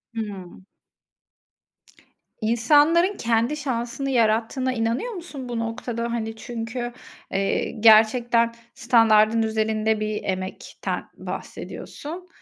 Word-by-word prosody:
Hımm. 195 -4 -6 1.8
İnsanların 295 - +4
kendi 235 +5 +1
şansını 260 -1 -3
yarattığına 235 +2 +1
inanıyor 235 - -1
musun, 310 - -8
bu 240 -1 -2
noktada? 230 +1 -3
Hani 225 -1 -3
çünkü, 240 +2 -5 0.4
eee, 195 0 0
gerçekten 230 +2 +5 0.2
standardın 225 -3 +4
üzerinde 220 0 0
bir 215 0 -3
emekten 185 0 -4
bahsediyorsun, 345 +5 -7
230 Hz, 85 wpm, -24 LUFS, 220-255 Hz, 1.8 s, gerçekten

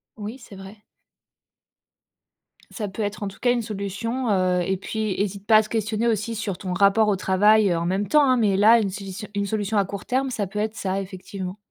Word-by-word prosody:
Oui, 215 +3 -7
c'est 220 -4 -13
vrai. 195 +2 -11 1.9
Ça 210 -4 -4
peut 195 +3 -6
être 205 0 -3
en 200 - -2
tout 195 - -15
cas 245 - +2
une 240 - -1
solution, 220 +4 -3
heu 185 -2 +2
et 190 +2 0
puis 215 +2 -3
hésite 200 0 -3
pas 220 - +7
à 215 - +4
se 215 - -11
questionner 220 0 -1
aussi 225 0 -1
sur 205 -4 -3
ton 185 -2 -4
rapport 200 +3 +4
au 205 - +2
travail, 205 +3 +4
heu, 170 - +1
en 170 - -2
même 190 +2 -1
temps, 300 -1 +5
hein. 255 - +5
Mais 210 -5 +2
là, 220 +4 +6
une 200 - -1
solution 195 +1 -7
une 200 0 0
solution 210 +1 -1
à 200 - +3
court 200 +1 -7
terme, 265 +1 0
ça 215 -6 -2
peut 210 +2 -5
être 215 +1 -2
ça, 190 -2 -2
effectivement. 190 0 -7
205 Hz, 225 wpm, -23 LUFS, 195-220 Hz, 1.9 s, pas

